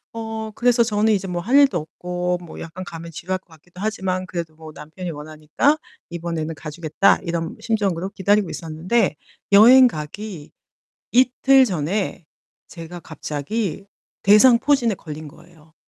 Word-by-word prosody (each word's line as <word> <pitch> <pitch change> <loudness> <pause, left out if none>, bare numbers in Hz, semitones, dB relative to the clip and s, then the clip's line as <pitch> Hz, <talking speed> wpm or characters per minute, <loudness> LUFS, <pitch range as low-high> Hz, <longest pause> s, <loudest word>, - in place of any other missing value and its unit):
어 220 -1 -5
그래서 240 +1 +3
저는 215 0 +1
이제 195 -2 0
'뭐 175 -1 -3
할 245 +9 0
일도 280 -8 +6
없고 180 +3 -3
뭐 170 - -10
약간 170 +3 -7
가면 165 -1 -8
지루할 185 +3 -4
것 - - -43
같기도 175 +3 -15
하지만 185 -4 -2
그래도 170 -3 -5
뭐 160 -1 -11
남편이 165 +5 -8
원하니까 155 - -1 0.3
이번에는 165 -2 -4
가 155 0 -8
주겠다.' 160 +4 +2
이런 170 -1 -3
심정으로 195 -5 -1
기다리고 200 0 +1
있었는데 165 +4 -1 0.4
여행 250 +5 +9
가기 160 -1 -7 0.6
이틀 260 +2 +5
전에 180 -2 -2 0.4
제가 170 0 -9
갑자기 165 +6 -4 0.4
대상포진에 235 +3 +5
걸린 155 -2 -9
거예요. 160 +1 -18
180 Hz, 320 characters per minute, -21 LUFS, 160-215 Hz, 0.6 s, 여행